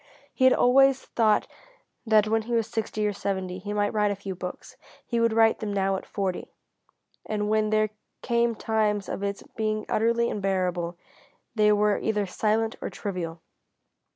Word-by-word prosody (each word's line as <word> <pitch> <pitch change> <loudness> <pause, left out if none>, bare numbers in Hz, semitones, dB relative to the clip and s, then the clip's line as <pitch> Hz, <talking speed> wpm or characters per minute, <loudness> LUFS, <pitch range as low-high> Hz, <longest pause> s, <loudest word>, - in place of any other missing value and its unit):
He 260 - +2
had 260 - +7
always 270 +1 +4
thought 220 -2 +2 0.6
that 215 -1 +4
when 225 +1 +2
he 235 +2 -5
was 230 -1 +2
sixty 215 -1 -2
or 205 - 0
seventy 190 -2 -3
he 205 +2 -6
might 205 0 0
write 210 -1 +2
a 200 - -1
few 195 -1 -6
books. 180 0 -8 0.3
He 235 - -1
would 230 0 +3
write 225 0 +4
them 215 -1 -3
now 195 -1 +1
at 190 - -6
forty. 190 -3 -3 0.8
And 210 -1 -1
when 215 0 +2
there 215 0 +2 0.3
came 235 -1 +1
times 210 -2 0
of - - -4
its 200 0 -3
being 215 -1 -1
utterly 235 +1 +1
unbearable, 180 -3 -1 0.6
they 210 -2 +4
were 210 0 +2
either 210 -2 0
silent 220 +4 0
or - - -3
trivial. 175 -5 -5
210 Hz, 170 wpm, -26 LUFS, 195-225 Hz, 0.8 s, had